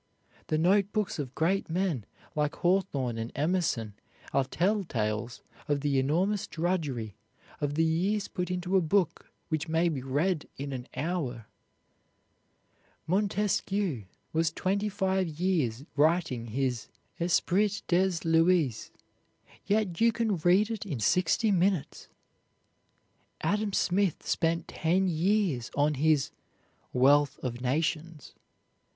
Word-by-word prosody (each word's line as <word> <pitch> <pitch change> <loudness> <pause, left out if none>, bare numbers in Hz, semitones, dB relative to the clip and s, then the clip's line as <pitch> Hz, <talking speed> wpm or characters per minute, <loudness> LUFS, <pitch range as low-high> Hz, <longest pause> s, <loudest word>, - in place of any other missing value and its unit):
The 155 - +1
note 195 +5 +3
books 210 -6 -1
of 135 -3 -5
great 180 +4 +1
men 165 - -1 0.3
like 150 0 0
Hawthorne 150 -11 0
and 115 +1 -4
Emerson 145 - 0 0.4
are 135 - +3
tell 195 +10 0
tales 110 - -3 0.2
of 145 -1 0
the 140 -2 +1
enormous 180 +9 +1
drudgery, 150 - -2 0.4
of 145 0 -2
the 165 - +3
years 190 +6 +1
put 180 -1 -4
into 180 +1 -1
a 190 - +5
book 175 +1 0 0.2
which 155 +1 -1
may 165 +2 +2
be 145 -5 -3
read 150 +6 0
in 140 0 -5
an 125 -1 -6
hour. 135 - -3 1.6
Montesquieu 195 - 0 0.3
was 165 0 +2
twenty 200 +5 -1
five 190 -2 0
years 155 -7 -1
writing 150 -6 +2
his 125 0 -2 0.3
"Esprit 190 +4 +1
des 185 +2 +3
Lois," 165 - +2 0.8
yet 205 -4 0
you 230 0 +6
can 220 -4 0
read 185 +7 +3
it 225 - -3
in 155 - -4
sixty 180 - +2
minutes. 185 -3 0 1.3
Adam 210 0 0
Smith 195 -2 +1
spent 165 0 0
ten 180 +4 +1
years 175 - +1
on 145 +1 +2
his 150 0 +2 0.6
"Wealth 140 +3 +4
of 120 -1 -4
Nations." 155 +3 -2
165 Hz, 120 wpm, -29 LUFS, 140-190 Hz, 1.6 s, you